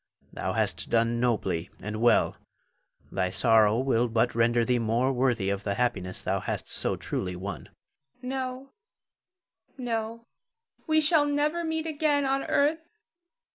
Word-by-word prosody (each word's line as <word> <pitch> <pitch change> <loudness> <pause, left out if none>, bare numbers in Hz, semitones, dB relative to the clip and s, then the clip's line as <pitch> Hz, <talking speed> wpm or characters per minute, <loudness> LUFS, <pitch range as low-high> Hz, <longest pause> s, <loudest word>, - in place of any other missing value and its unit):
Thou - - -3
hast - - 0
done 115 0 +2
nobly 95 -8 0
and 105 +1 -5
well; 120 - +3 0.8
thy 90 -1 0
sorrow 110 +1 +4
will 125 -2 +1
but 115 -1 +1
render 115 0 +2
thee 125 0 +1
more 120 +4 +1
worthy 120 -6 +1
of 100 0 -3
the 100 -1 -1
happiness 110 -7 -1
thou - - 0
hast - - -4
so - - +1
truly 90 -1 -4
won. 95 +3 -7 0.5
Zara. 250 - -6
No, 260 0 -4 1.1
no; 230 -2 -4 0.6
we 315 0 +4
shall 300 -1 +4
never 300 +4 0
meet 320 -1 -2
again 295 -2 +1
on 270 0 0
earth. 320 +4 0
125 Hz, 140 wpm, -27 LUFS, -, 1.1 s, sorrow